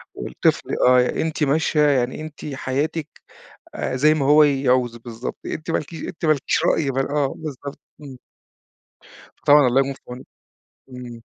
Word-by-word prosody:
والطفل 60 Hz, -, -1 dB, 0.2 s
آه 125 Hz, 0 st, +5 dB
أنتِ 160 Hz, -1 st, -2 dB
ماشية 150 Hz, +2 st, +1 dB
يعني، 130 Hz, +1 st, 0 dB
أنتِ 155 Hz, -1 st, -9 dB
حياتِك 145 Hz, +4 st, -2 dB, 0.7 s
آآ 130 Hz, -, -3 dB
زي 155 Hz, +4 st, +4 dB
ما 140 Hz, -3 st, -1 dB
هو 150 Hz, +2 st, +6 dB
يعوز 130 Hz, -4 st, +1 dB
بالضبط، 115 Hz, +1 st, -7 dB
أنتِ 155 Hz, -, -5 dB
ما -, -, +1 dB
لكي 160 Hz, +2 st, -7 dB
أنتِ 165 Hz, -, -8 dB
ما 155 Hz, -, +5 dB
لكيش 140 Hz, -, -1 dB
رأي 145 Hz, -4 st, +1 dB
بال 135 Hz, 0 st, -1 dB
آه 145 Hz, -2 st, 0 dB
بالضبط 145 Hz, -2 st, -7 dB, 0.2 s
إمم. 135 Hz, -3 st, -10 dB, 1.2 s
فطبعًا 145 Hz, -2 st, +5 dB
الله 125 Hz, +2 st, +3 dB
يكون 135 Hz, 0 st, -2 dB
في -, -, -20 dB
عَونِك. 125 Hz, +1 st, -9 dB, 0.6 s
إمم. 125 Hz, -2 st, -9 dB
135 Hz, 160 wpm, -22 LUFS, 125-150 Hz, 1.2 s, هو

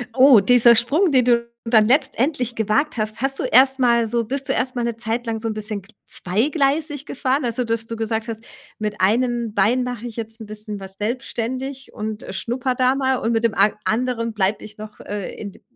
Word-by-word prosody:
oh, 260 Hz, -3 st, +8 dB
dieser 235 Hz, +3 st, +6 dB
Sprung, 295 Hz, -, +2 dB
den 255 Hz, -3 st, +4 dB
du 235 Hz, -1 st, +1 dB
dann 220 Hz, -2 st, +4 dB
letztendlich 260 Hz, -2 st, +1 dB
gewagt 240 Hz, +8 st, 0 dB
hast, 215 Hz, +1 st, -2 dB
hast 270 Hz, 0 st, -1 dB
du -, -, -1 dB
erst 265 Hz, +2 st, +5 dB
mal 235 Hz, -2 st, +3 dB
so 230 Hz, +1 st, -1 dB
bist 270 Hz, +3 st, -4 dB
du -, -, +2 dB
erst 255 Hz, 0 st, -2 dB
mal 240 Hz, -, -1 dB
'ne 235 Hz, -1 st, -2 dB
Zeit 230 Hz, +1 st, -3 dB
lang 225 Hz, -1 st, -2 dB
so 225 Hz, -, -4 dB
'n 220 Hz, -, -2 dB
bisschen 215 Hz, -1 st, -4 dB
gl 210 Hz, +4 st, -21 dB
zweigleisig 285 Hz, -, 0 dB
gefahren? 270 Hz, 0 st, -1 dB
Also, 240 Hz, +1 st, -1 dB
dass 225 Hz, 0 st, -2 dB
du 230 Hz, -, -4 dB
gesagt 225 Hz, 0 st, -2 dB
hast: 225 Hz, 0 st, -6 dB, 0.4 s
„Mit 210 Hz, -1 st, -3 dB
einem 235 Hz, +2 st, +1 dB
Bein 225 Hz, +6 st, +2 dB
mache 245 Hz, -2 st, -5 dB
ich 230 Hz, -, -9 dB
jetzt 225 Hz, 0 st, -6 dB
'n -, -, -7 dB
bisschen 210 Hz, 0 st, -8 dB
was 190 Hz, 0 st, -7 dB
selbstständig 255 Hz, +4 st, -4 dB
und, 215 Hz, 0 st, -5 dB
äh, -, -, -8 dB
schnuppere 245 Hz, +6 st, -2 dB
da 255 Hz, +1 st, +3 dB
mal 265 Hz, -1 st, +1 dB
und 230 Hz, -1 st, -1 dB
mit 225 Hz, 0 st, 0 dB
dem 225 Hz, -, +1 dB
an 210 Hz, -, +4 dB
anderen 230 Hz, 0 st, -1 dB
bleibe 200 Hz, 0 st, 0 dB
ich 215 Hz, 0 st, -11 dB
noch, 215 Hz, 0 st, -10 dB
äh, 205 Hz, -2 st, -5 dB
in 200 Hz, -3 st, -8 dB
d -, -, -19 dB
235 Hz, 220 wpm, -21 LUFS, 215-255 Hz, 0.4 s, oh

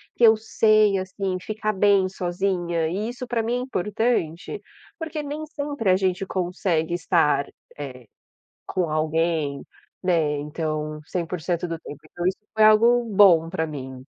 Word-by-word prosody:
que 240 Hz, -, -1 dB
eu 220 Hz, -1 st, +8 dB
sei, 215 Hz, -2 st, +3 dB
assim, 190 Hz, 0 st, -3 dB
ficar 215 Hz, +1 st, -2 dB
bem 195 Hz, -1 st, +4 dB
sozinha 175 Hz, -2 st, -1 dB
e 205 Hz, +7 st, -2 dB
isso 250 Hz, 0 st, -7 dB
para 230 Hz, -2 st, -1 dB
mim 235 Hz, +2 st, -1 dB
é -, -, -2 dB
importante 210 Hz, -, -1 dB, 0.4 s
porque 320 Hz, -3 st, -4 dB
nem 300 Hz, +2 st, -5 dB
sempre 285 Hz, -8 st, -3 dB
a 185 Hz, -, +5 dB
gente 190 Hz, 0 st, 0 dB
consegue 175 Hz, -3 st, -1 dB
estar, 160 Hz, -5 st, +2 dB, 0.3 s
eh, 130 Hz, -4 st, -8 dB, 0.6 s
com 180 Hz, -3 st, -1 dB
alguém, 155 Hz, -2 st, 0 dB, 0.4 s
né, 160 Hz, -5 st, +1 dB
então 155 Hz, 0 st, -4 dB
100% 175 Hz, 0 st, -2 dB
do 165 Hz, -1 st, -4 dB
tempo. 145 Hz, -2 st, -10 dB
Então 175 Hz, -, -4 dB
isso 190 Hz, -, -1 dB
foi 220 Hz, -1 st, +3 dB
algo 230 Hz, +3 st, +6 dB
bom 175 Hz, -5 st, +6 dB
para 160 Hz, -3 st, -2 dB
mim. 130 Hz, -3 st, -7 dB
185 Hz, 150 wpm, -24 LUFS, 160-215 Hz, 0.6 s, eu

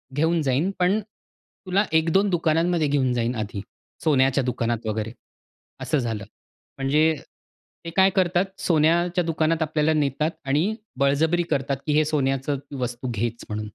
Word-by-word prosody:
घेऊन 160 Hz, +2 st, +2 dB
जाईन, 145 Hz, +7 st, +1 dB
पण, 185 Hz, +4 st, +3 dB, 0.7 s
तुला 190 Hz, +3 st, +3 dB
1 160 Hz, +1 st, +1 dB
2 200 Hz, +1 st, +3 dB
दुकानांमध्ये 165 Hz, -1 st, +1 dB
घेऊन 135 Hz, -3 st, +1 dB
जाईन 120 Hz, 0 st, -1 dB
आधी. 105 Hz, -2 st, -4 dB, 0.4 s
सोन्याच्या 135 Hz, -3 st, +3 dB
दुकानात, 120 Hz, -2 st, -2 dB
वगैरे. 110 Hz, +1 st, -2 dB, 0.7 s
असं -, -, 0 dB
झालं. 115 Hz, -4 st, -3 dB, 0.5 s
म्हणजे 150 Hz, +4 st, +3 dB, 0.7 s
ते -, -, -4 dB
काय 190 Hz, 0 st, +6 dB
करतात? 180 Hz, -1 st, +2 dB, 0.2 s
सोन्याच्या 175 Hz, +2 st, +2 dB
दुकानात 165 Hz, 0 st, 0 dB
आपल्याला 155 Hz, 0 st, +1 dB
नेतात 150 Hz, +2 st, 0 dB
आणि 155 Hz, +11 st, +1 dB, 0.2 s
बळजबरी 160 Hz, +5 st, +2 dB
करतात 140 Hz, 0 st, 0 dB
की 150 Hz, -, +2 dB
हे 155 Hz, +1 st, +3 dB
सोन्याचं 140 Hz, -2 st, 0 dB, 0.2 s
वस्तू 125 Hz, +1 st, -3 dB
घेच 115 Hz, +2 st, -3 dB
म्हणून. 105 Hz, 0 st, -3 dB
150 Hz, 140 wpm, -24 LUFS, 130-165 Hz, 0.7 s, काय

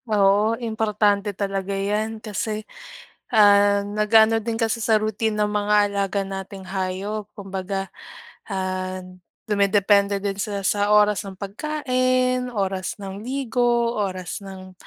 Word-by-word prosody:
Oo, 210 Hz, +2 st, +3 dB
importante 210 Hz, -3 st, 0 dB
talaga 195 Hz, -1 st, -2 dB
yan 210 Hz, +3 st, -1 dB
kasi 215 Hz, +1 st, -3 dB, 0.7 s
ah, 205 Hz, -1 st, +6 dB
nag-aano 220 Hz, +2 st, +4 dB
din 225 Hz, 0 st, -2 dB
kasi 225 Hz, 0 st, 0 dB
sa 220 Hz, -1 st, +4 dB
routine 215 Hz, 0 st, -1 dB
ng 210 Hz, -, +2 dB
mga 210 Hz, 0 st, +1 dB
alaga 200 Hz, 0 st, -1 dB
nating 195 Hz, 0 st, -7 dB
hayop. 195 Hz, +3 st, -3 dB
Kumbaga, 195 Hz, -1 st, -4 dB, 0.6 s
ah, 185 Hz, -1 st, -3 dB, 0.4 s
dumedepende 200 Hz, 0 st, +3 dB
din 200 Hz, -1 st, -2 dB
sila 200 Hz, -2 st, -3 dB
sa 205 Hz, +1 st, +1 dB
oras 210 Hz, -1 st, +4 dB
ng 190 Hz, -1 st, -9 dB
pagkain, 255 Hz, +2 st, 0 dB
oras 195 Hz, -3 st, -2 dB
ng 195 Hz, 0 st, -7 dB
ligo, 240 Hz, -2 st, +1 dB
oras 185 Hz, -3 st, -3 dB
ng 185 Hz, -1 st, -10 dB
205 Hz, 120 wpm, -23 LUFS, 195-220 Hz, 0.7 s, ah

